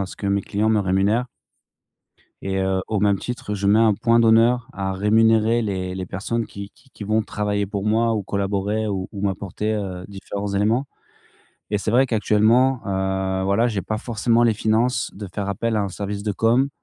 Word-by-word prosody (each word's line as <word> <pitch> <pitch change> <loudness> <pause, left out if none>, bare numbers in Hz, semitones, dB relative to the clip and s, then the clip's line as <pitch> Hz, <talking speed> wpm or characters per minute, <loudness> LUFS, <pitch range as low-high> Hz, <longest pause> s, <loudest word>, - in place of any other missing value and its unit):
à 100 - -1
ce - - -11
que 100 - -5
mes 100 0 +1
clients 105 +2 -1
me 110 -1 +3
rémunèrent. 100 +6 +1 1.1
Et 95 0 -2
heu, 95 0 0
au 105 -2 -1
même 100 -1 +2
titre, 120 -4 -5
je 100 0 -2
mets 105 +3 +5
un 110 -2 +4
point 115 +1 +3
d'honneur 115 +2 +4
à 95 0 -3
rémunérer 110 +3 +3
les 95 -4 -3
les 95 -1 -4
personnes 115 +6 -3
qui 100 0 -9
qui 135 - -26
qui 110 - -11
vont 110 +2 +1
travailler 105 -1 -2
pour 100 0 -4
moi, 115 +1 +2
ou 105 - -1
collaborer, 100 +2 -1
ou 95 -2 -3
ou 100 - -7
m'apporter, 100 +2 -2
heu, 95 -3 -4
différents 100 0 -6
éléments. 110 +7 +1 0.8
Et 105 - +1
c'est 105 +2 -2
vrai 130 +2 +4
qu'actuellement, 115 +3 +3
heu, 95 -1 -1
voilà, 105 +5 +2
j'ai 105 -4 -2
pas 110 0 -3
forcément 115 0 +1
les 115 -2 +4
finances 110 +4 0
de 100 -1 -7
faire 100 -1 -3
appel 110 +3 -1
à 105 - +1
un 100 - -2
service 100 +2 -5
de 105 - 0
communication. 120 +6 +2
105 Hz, 200 wpm, -22 LUFS, 100-115 Hz, 1.1 s, mets